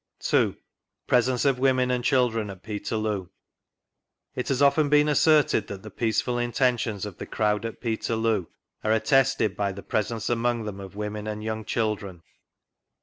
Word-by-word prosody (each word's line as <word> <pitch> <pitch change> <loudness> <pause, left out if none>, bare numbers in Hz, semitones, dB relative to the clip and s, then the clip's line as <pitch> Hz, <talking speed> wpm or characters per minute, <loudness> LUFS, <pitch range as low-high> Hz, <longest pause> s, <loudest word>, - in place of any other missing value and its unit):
2— - - +2 0.5
PRESENCE 125 +1 +2
OF 135 -3 +2
WOMEN 130 -1 +2
AND 125 -1 0
CHILDREN 120 -5 +1
AT 95 -2 -10
PETERLOO. 105 -3 -3 1.0
It 125 - -4
has 135 -2 0
often 145 +1 +4
been 150 0 +5
asserted 150 -6 +3
that 100 -1 -8
the 110 - -9
peaceful 115 +3 0
intea 120 0 +1
tions 105 -3 -3
of 100 -5 -9
the - - -6
crowd 105 0 0
at 115 - -6
Peterloo 110 -4 -1 0.4
are 110 - +2
attested 120 -1 +2
by 100 -1 -1
the 100 +1 -9
presence 110 +1 -2
among 120 0 0
them 105 -2 -6
of 95 0 -9
women 105 0 -4
and 105 0 -4
young 110 0 -3
children. 105 -6 -2
110 Hz, 160 wpm, -26 LUFS, 105-125 Hz, 1.0 s, been